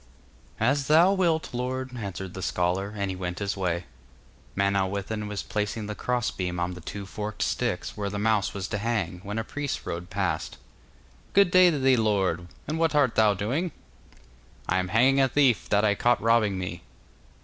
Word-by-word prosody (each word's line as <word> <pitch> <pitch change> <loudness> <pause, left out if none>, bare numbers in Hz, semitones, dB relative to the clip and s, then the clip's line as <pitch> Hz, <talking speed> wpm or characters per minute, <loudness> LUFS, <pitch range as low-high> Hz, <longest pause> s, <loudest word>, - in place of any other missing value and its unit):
'As 135 +5 +1
thou 170 +5 +6
wilt, 170 -7 +1
lord,' 130 +1 -3
answered 95 -4 -5
the 95 - -6
scholar, 90 +3 0
and 100 -1 -1
he - - -4
went 90 -1 -4
his 100 -1 -2
way. 90 -2 -1 0.7
Manawyddan 100 +2 0
was 105 -1 -4
placing 105 +1 -2
the 105 - -4
cross 125 +2 -1
beam 90 -2 -3
on 90 +1 -1
the 90 - -10
two 100 +4 -6
forked 105 +2 -4
sticks, - - -2
where 100 -1 -3
the 105 - -4
mouse 105 -2 +1
was 100 -1 -4
to 105 - -2
hang, 105 -6 -1
when 105 +2 -5
a 115 - 0
priest 145 +4 -4
rode 85 +2 -5
past. 90 -5 -2 0.8
'Good 200 -2 +5
day 185 0 +7
to 155 - 0
thee, 130 -1 +4
lord; 95 -6 +1 0.2
and 155 +2 -2
what 165 -2 +2
art 140 -5 +4
thou 105 -2 +4
doing?' 135 - -1 1.0
'I 95 - +2
am 90 - -1
hanging 130 +8 +4
a 135 - +5
thief 130 -5 +2
that 105 +1 +3
I 105 - +4
caught 120 +3 +2
robbing 110 -4 +3
me. 90 -1 -5
105 Hz, 185 wpm, -26 LUFS, 95-125 Hz, 1.0 s, day